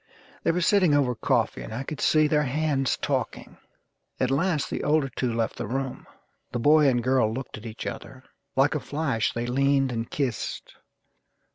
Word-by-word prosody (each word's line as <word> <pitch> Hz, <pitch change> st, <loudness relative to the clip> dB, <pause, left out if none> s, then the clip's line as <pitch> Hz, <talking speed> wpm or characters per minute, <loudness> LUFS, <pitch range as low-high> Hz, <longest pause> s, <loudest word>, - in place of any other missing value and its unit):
They -, -, 0 dB
were 180 Hz, +2 st, +1 dB
sitting 180 Hz, -4 st, +4 dB
over 135 Hz, -4 st, +2 dB
coffee, 115 Hz, 0 st, 0 dB
and -, -, -8 dB
I 120 Hz, +5 st, -4 dB
could 150 Hz, +1 st, -6 dB
see 155 Hz, -1 st, +4 dB
their 150 Hz, 0 st, +2 dB
hands 145 Hz, -1 st, 0 dB
talking. -, -, -3 dB, 0.6 s
At 130 Hz, 0 st, +1 dB
last 155 Hz, +1 st, +1 dB
the -, -, -4 dB
older 150 Hz, -2 st, +2 dB
two 125 Hz, -2 st, 0 dB
left 115 Hz, -1 st, -1 dB
the -, -, -4 dB
room. 130 Hz, +2 st, -4 dB, 0.4 s
The 125 Hz, -, -2 dB
boy 150 Hz, +4 st, +5 dB
and 120 Hz, -3 st, +2 dB
girl 130 Hz, -3 st, +2 dB
looked 130 Hz, +2 st, -6 dB
at 110 Hz, -, -9 dB
each 110 Hz, -, -7 dB
other.... 130 Hz, -1 st, -7 dB, 0.3 s
Like 135 Hz, +2 st, +3 dB
a 150 Hz, -, -1 dB
flash 135 Hz, -3 st, -1 dB
they 120 Hz, 0 st, -3 dB
leaned 135 Hz, +1 st, +2 dB
and 115 Hz, -1 st, -3 dB
kissed. 130 Hz, -7 st, -3 dB
135 Hz, 180 wpm, -26 LUFS, 120-150 Hz, 0.6 s, boy